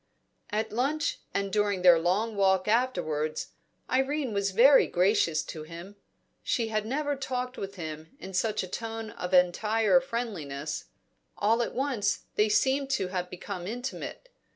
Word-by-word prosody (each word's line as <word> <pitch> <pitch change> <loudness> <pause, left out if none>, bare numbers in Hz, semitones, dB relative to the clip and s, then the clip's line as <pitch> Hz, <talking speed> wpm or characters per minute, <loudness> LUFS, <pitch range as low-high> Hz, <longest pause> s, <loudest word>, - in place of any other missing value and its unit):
At 215 +1 -1
lunch 280 +7 0
and 200 -1 -2
during 205 -3 +1
their 175 -2 +8
long 200 +7 0
walk 190 -1 +3
afterwards, 185 -11 0 0.4
Irene 265 -1 0
was 200 0 +1
very 255 +8 +6
gracious 180 -3 +2
to 155 - -7
him. 170 +5 -9 0.5
She 230 -3 0
had 215 -1 -1
never 290 +3 -1
talked 255 -2 -3
with 195 -3 -6
him 160 - -7
in 190 - -8
such 215 +3 0
a - - -5
tone 225 +2 -5
of 180 - -6
entire 210 +6 +4
friendliness; 180 - -4 0.5
all 225 +3 +2
at - - -3
once 260 -6 0
they 210 +1 +2
seemed 270 +5 +2
to 195 -9 0
have 180 -1 -3
become 180 0 -6
intimate. 245 - -6
210 Hz, 150 wpm, -28 LUFS, 180-245 Hz, 0.5 s, their